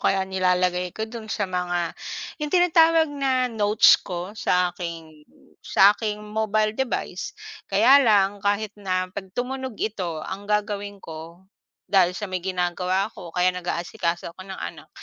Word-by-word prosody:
kaya 190 -1 +2
nilalagay 180 -1 +1
ko 220 - -1
do'n 220 -1 -9
sa 210 - -1
mga 175 -2 -2 0.5
'yong 300 - -2
tinatawag 330 -2 +5
na 265 -2 +1
notes 210 0 +5
ko 180 +1 -6
sa 180 -4 +1
aking 165 -3 -8 0.3
sa 200 +2 +5
aking 210 -1 -3
mobile 215 0 0
device. 265 +2 -3 0.3
Kaya 235 +8 +6
lang 205 -5 +3
kahit 205 +1 0
na 185 -1 -1
'pag 190 -1 -6
tumunog 260 -1 -3
ito, 185 -6 -3
ang 200 +2 -7
gagawin 205 -1 -1
ko, 165 0 -10 0.4
dahil 180 -2 +3
sa 210 - -4
may 185 -2 -3
ginagawa 180 +1 -1
ako 175 - -10
o - - -31
kaya 180 +1 +3
nag-aasikaso 170 -1 -3
ako 185 +2 -12
ng 190 - -7
anak, - - -8
195 Hz, 150 wpm, -24 LUFS, 180-215 Hz, 0.5 s, Kaya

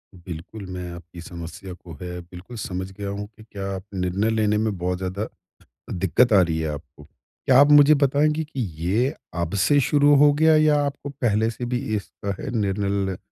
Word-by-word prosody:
बिल्कुल, 90 +4 -9
मैं 90 -1 -6
आपकी 85 0 -11
समस्या 85 +2 -8
को 90 -2 -12
है 90 0 -5
बिल्कुल 90 +7 -11
समझ 95 -4 -4
गया 100 +1 -6
हूँ 100 +1 -5
कि 110 - -13
क्या 100 -3 -7
आप 95 - -7
निर्णय 95 +4 0
लेने 105 -1 +1
में 110 -2 -1
बहुत 90 +1 -2
ज़्यादा, 95 +3 -3 0.6
दिक्कत 95 +6 +2
आ 100 - +7
रही 80 -2 0
है 80 - -1
आपको। 75 0 -9
क्या 125 - -1
आप 145 - +7
मुझे 145 +1 +8
बताएँगे 150 +3 +2
कि 145 -3 -8 0.2
ये 115 +10 +1 0.3
अब 85 +2 -3
से 145 -1 +4
शुरू 145 +2 +4
हो 145 +1 +6
गया 160 +2 +4
या 155 -1 +4
आपको 140 0 -5
पहले 115 -5 0
से 120 +2 -6
भी 125 +1 -1 0.2
इसका 100 -1 -5
है 140 - -4
निर्णय 100 -1 -1
ल 90 - -8
100 Hz, 195 wpm, -23 LUFS, 90-130 Hz, 0.6 s, मुझे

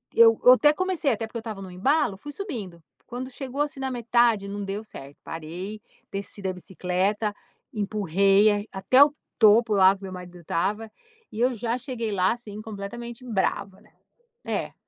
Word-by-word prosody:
Eu 225 -1 +7
eu 250 - +9
até 295 +3 +5
comecei 360 -4 0
até 225 -1 -2
porque 225 - -7
eu - - -2
estava 220 -3 -7
no 190 -2 -8
embalo, 240 - +1
fui 290 +8 -9
subindo. 230 - -6 0.2
Quando 255 +1 -6
chegou, 270 +1 -4
assim, 295 -2 -2
na 265 0 -2
metade, 235 -4 +2
não 200 +1 -5
deu 200 +2 -4
certo. 140 -9 -11
Parei, 180 +7 -7 0.3
desci 200 +1 -6
da 190 -1 -2
bicicleta, 190 +4 -1 0.4
empurrei 200 -1 +3
em 205 +1 -1
até 255 +8 +5
o 290 - +1 0.3
topo 220 +1 +6
lá 190 -1 +6
que 195 - -16
meu 190 - -6
marido 180 -1 -9
estava, 210 +7 -2 0.4
e 215 - -7
eu 250 +1 +3
já 235 +2 -2
cheguei 245 -4 -4
lá, 185 0 +2
assim, 215 -3 -9
completamente 225 +3 -7
brava, 195 -3 -2
né. 215 - -24 0.5
É. - - -3
215 Hz, 180 wpm, -25 LUFS, 195-240 Hz, 0.5 s, eu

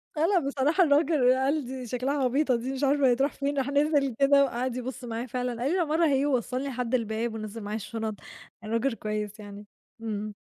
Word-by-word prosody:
آه، 310 +1 +2
لأ، 370 +1 +3
بصراحة 285 +5 +2
الراجل 290 -4 +4
قال 270 +3 0
دي 255 0 -6
شكلها 265 +4 -1
عبيطة 260 +1 +2
دي 245 +3 -3
مش 270 +1 -4
عارفة 280 0 +3
هي 250 - +5
هتروح 270 +4 0
فين، 285 0 -2
راح 270 0 0
نزِل 285 -3 +2
كده 280 0 +5
وقعد 255 -1 -2
يبُص 255 +1 -5
معايا 235 0 -4
فعلًا، 250 -1 -3
قال 270 +4 0
لي: 370 - +1
"العمارة 330 -1 +2
أهي." 280 -2 +2
ووصلني 255 0 -1
لحد 250 -2 -1
الباب 225 0 -2
ونزّل 220 0 -6
معايا 205 +1 -4
الشُنط، 220 0 -4 0.5
الراجل 230 +4 0
كويس 210 -1 -4
يعني. 205 0 -10 0.4
إمم. 215 -2 -4
255 Hz, 200 wpm, -27 LUFS, 230-280 Hz, 0.5 s, هي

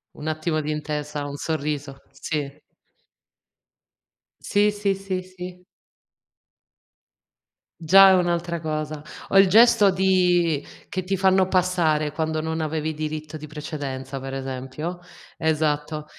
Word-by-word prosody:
Un 150 - -7
attimo 155 0 -1
di 150 - -5
intesa, 150 -1 -3
un 145 0 -6
sorriso, 145 -3 -3
sì. 145 -3 -4 1.8
Sì, 205 +1 +2
sì, 205 -1 0
sì, 190 -1 -4
sì. 180 0 -10 2.1
Già 190 +4 +7
è - - +6
un'altra 175 -2 0
cosa. 155 -1 -3 0.3
O 195 - +3
il 195 -1 +8
gesto 215 0 +6
di 180 -5 +2 0.2
che 185 - -3
ti 195 +2 -1
fanno 190 0 +3
passare 170 -5 +1
quando 160 0 -1
non 160 +1 -2
avevi 155 0 -2
diritto 155 0 -5
di 155 0 -8
precedenza 140 -3 -6
per 135 0 -6
esempio. 135 +6 -5 0.4
Esatto. 155 -1 -1
155 Hz, 120 wpm, -24 LUFS, 150-180 Hz, 2.1 s, il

